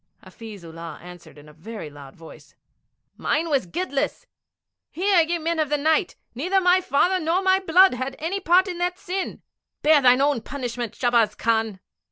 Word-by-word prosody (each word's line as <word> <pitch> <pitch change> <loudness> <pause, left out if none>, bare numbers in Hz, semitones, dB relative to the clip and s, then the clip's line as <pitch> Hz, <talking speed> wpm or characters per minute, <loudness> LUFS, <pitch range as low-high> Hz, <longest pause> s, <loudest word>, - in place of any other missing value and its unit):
Hafiz 220 -5 -11
Ullah 165 0 -9
answered 175 -2 -13
in 145 +1 -15
a 150 - -15
very 200 +3 -9
loud 140 -2 -13
voice, 165 -1 -15 0.6
'Mine 330 +2 -1
was 265 -10 +1
guiltless. 320 - -3 0.6
Hear, 375 0 +2
ye 340 +2 -1
Men 330 0 -2
of 305 -2 0
the 295 - +1
Night, 315 +5 +1 0.2
neither 360 +11 0
my 365 0 +3
father 360 +5 +1
nor 340 +3 0
my 380 0 +3
blood 375 -1 +5
had 260 +2 -4
any 345 +6 -3
part 370 +1 +3
in 355 -2 -5
that 355 0 -1
sin. 385 -1 -5 0.4
Bear 305 -1 +5
thou 250 -1 +6
thy 270 - +1
own 285 -4 +1
punishment, 245 -3 -5
Shahbaz 235 -4 +2
Khan.' 225 -4 -1
290 Hz, 180 wpm, -23 LUFS, 225-360 Hz, 0.6 s, thou